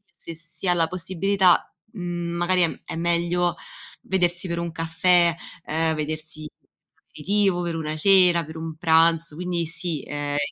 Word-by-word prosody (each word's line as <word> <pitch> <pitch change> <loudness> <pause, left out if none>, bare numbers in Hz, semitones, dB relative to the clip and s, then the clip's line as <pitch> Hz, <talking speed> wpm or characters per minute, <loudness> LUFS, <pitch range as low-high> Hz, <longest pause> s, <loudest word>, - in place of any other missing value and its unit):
se 165 - -8
si 170 +2 -4
ha 175 - +5
la 165 -1 +3
possibilità, 185 +1 +1 0.2
mhmm, 175 -3 -4
magari 180 +1 +2
è 170 - -2
è - - -6
meglio 170 +1 0 0.5
vedersi 175 -1 0
per 170 -1 -3
un 170 0 -4
caffè, 165 +1 +2 0.3
ehm, 160 +1 0
vedersi 155 0 -4
per - - -45
un - - -45
aperitivo, 195 +2 0
per 170 -1 -3
una 155 -1 -4
cena, 180 -1 +5
per 160 +1 -11
un 160 0 -6
pranzo, 165 -1 +2
quindi 175 -1 -2
sì, 165 -2 -2
ehm 145 0 -3
170 Hz, 160 wpm, -23 LUFS, 160-175 Hz, 0.5 s, ha